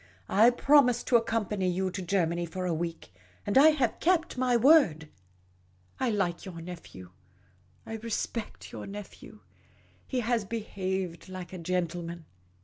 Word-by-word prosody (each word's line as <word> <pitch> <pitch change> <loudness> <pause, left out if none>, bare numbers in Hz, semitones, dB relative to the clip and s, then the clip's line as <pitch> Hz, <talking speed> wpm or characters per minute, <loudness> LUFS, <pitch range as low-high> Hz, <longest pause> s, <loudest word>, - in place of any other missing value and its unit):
I 220 +4 +6
promised 250 0 +4
to 245 - +4
accompany 215 -5 +1
you 185 +1 -1
to 190 +1 -5
Germany 175 -2 0
for 185 +3 -5
a 175 - 0
week; 165 - -5 0.3
and 205 - -2
I 275 +4 +8
have 275 -7 0
kept 340 -1 +1
my 250 -1 +2
word. 235 - +4 0.9
I 260 - +1
like 190 -5 0
3'our 170 -3 -9
nephew; 165 - -10 0.7
I 225 - -5
respect 230 0 -4
your - - -7
nephew; 205 0 -10 0.7
he 255 -2 -1
has 235 -1 0
behaved 190 -5 -4
like 185 -1 -8
a 185 - -6
gentleman. 170 -1 -3
195 Hz, 140 wpm, -29 LUFS, 175-235 Hz, 0.9 s, I